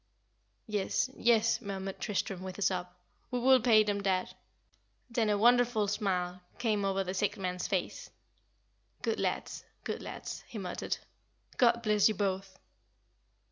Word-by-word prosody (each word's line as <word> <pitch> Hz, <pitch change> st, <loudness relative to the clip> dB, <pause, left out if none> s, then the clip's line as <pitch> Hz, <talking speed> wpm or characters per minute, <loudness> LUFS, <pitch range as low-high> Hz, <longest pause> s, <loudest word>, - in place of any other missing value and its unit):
"Yes, 210 Hz, +4 st, 0 dB
yes," 230 Hz, -1 st, +3 dB
murmured 195 Hz, -2 st, -5 dB
Tristram, 195 Hz, -2 st, -2 dB
with 185 Hz, -1 st, -6 dB
a 205 Hz, -, -1 dB
sob; 180 Hz, -2 st, +1 dB, 0.4 s
"we 250 Hz, -, -1 dB
will 260 Hz, +1 st, +5 dB
pay 220 Hz, -2 st, +6 dB
them, 205 Hz, -1 st, -1 dB
dad." 190 Hz, -2 st, 0 dB, 0.8 s
Then 230 Hz, -2 st, +1 dB
a 205 Hz, -, +3 dB
wonderful 240 Hz, -1 st, +4 dB
smile 185 Hz, -3 st, -1 dB, 0.2 s
came 215 Hz, -4 st, 0 dB
over 195 Hz, 0 st, +1 dB
the 185 Hz, 0 st, -4 dB
sick 205 Hz, +2 st, 0 dB
man's 180 Hz, -2 st, -2 dB
face. -, -, -2 dB, 0.9 s
"Good -, -, 0 dB
lads, -, -, -2 dB, 0.2 s
good -, -, -4 dB
lads," -, -, -7 dB
he 230 Hz, -, -8 dB
muttered. 185 Hz, -3 st, -3 dB, 0.6 s
"God 235 Hz, -1 st, +4 dB
bless 210 Hz, -1 st, +4 dB
you 215 Hz, -, -1 dB
both!" 190 Hz, -1 st, -2 dB
205 Hz, 140 wpm, -31 LUFS, 190-225 Hz, 0.9 s, pay